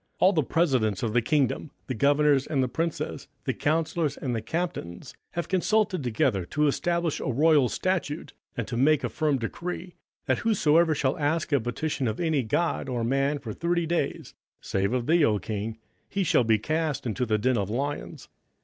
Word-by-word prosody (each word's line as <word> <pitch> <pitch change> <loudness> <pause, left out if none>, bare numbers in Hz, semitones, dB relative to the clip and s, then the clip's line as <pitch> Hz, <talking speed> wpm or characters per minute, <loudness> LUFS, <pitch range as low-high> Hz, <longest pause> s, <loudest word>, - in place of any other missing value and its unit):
27:006:007 - - -45
All 190 +2 +6
the 160 - +3
presidents 125 - +1
of 110 -2 -1
the 120 - +4
kingdom, 145 +3 0
the 130 - -3
governors, 145 +2 +3
and 135 -4 +1
the - - +1
princes, 165 +6 -3 0.2
the - - 0
counsellors, 160 0 0
and 125 -3 -2
the 110 - -2
captains, 115 - -4 0.2
have 170 - -3
consulted 200 0 +1
together 110 -4 +1
to 150 +12 0
establish 170 +2 0
a - - -5
royal 145 0 +4
statute, 170 -3 -2 0.2
and 115 - -2
to 120 - -4
make 145 +4 +3
a - - -1
firm 150 -3 +1
decree, 175 +9 -5 0.3
that - - +1
whosoever 165 -7 +3
shall 135 0 0
ask 155 +2 0
a 140 - +4
petition 130 +3 -2
of 110 0 -2
any 160 -5 +1
God 135 +5 -1
or 120 -2 -1
man 135 +4 +1
for 120 -7 -6
thirty 170 +3 0
days, 170 +1 -2 0.3
save 100 +1 -1
of 125 -1 0
thee, 165 +2 +4
O 110 -7 +3
king, 110 +3 -4 0.3
he 200 - 0
shall 165 -7 +3
be 110 -1 +3
cast 155 +4 -1
into 125 +2 -1
the 110 -3 +1
den 125 +4 +1
of 100 -1 -2
lions. 140 +6 -4
145 Hz, 190 wpm, -27 LUFS, 120-165 Hz, 0.3 s, All